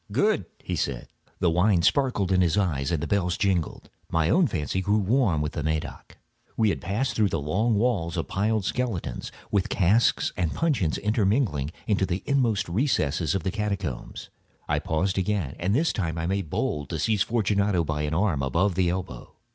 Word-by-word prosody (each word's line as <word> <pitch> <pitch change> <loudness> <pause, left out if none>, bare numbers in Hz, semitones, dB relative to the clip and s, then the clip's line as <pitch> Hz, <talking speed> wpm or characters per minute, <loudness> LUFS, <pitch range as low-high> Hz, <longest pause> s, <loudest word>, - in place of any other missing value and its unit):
"Good!" - - +1
he - - -4
said. 65 -3 -3 0.3
The 85 - +2
wine 90 +1 +3
sparkled 125 - +2
in 90 -1 +4
his 85 +1 +2
eyes 75 -9 0
and 80 -3 -1
the - - -2
bells 90 -3 0
jingled. 95 -5 -1 0.2
My 80 +1 +1
own 175 - +4
fancy 90 - -2
grew 100 +3 +2
warm 105 - +2
with 75 - -2
the 75 - -4
Medoc. 80 -1 -4 0.4
We 110 -2 +3
had - - -2
passed 105 +10 -1
through 105 -3 +3
walls 100 - 0
of 80 - -2
piled 105 +1 0
bones, 110 - -3 0.2
with 100 -3 +1
casks 100 +6 +2
and 85 -3 -1
puncheons 130 - +1
intermingling, 105 - +1 0.2
into 100 -3 +1
the 90 +1 -2
inmost 115 -7 +1
recesses 85 - 0
of 95 - -1
the 95 - -1
catacombs. 100 - -4 0.4
I - - +1
paused 95 +4 0
again, 95 -7 -1
and 95 +5 +1
this 160 +5 +2
time 85 -5 -2
I 80 - -2
made 95 -2 -2
bold 75 -1 -2
to 80 - -3
seize 105 +4 +1
Fortunato 100 -5 +1
by 75 -1 -2
an 75 +1 -1
arm 90 -6 +1
above 85 +9 +1
the 90 0 +1
elbow. 90 0 -5
95 Hz, 180 wpm, -26 LUFS, 80-105 Hz, 0.4 s, in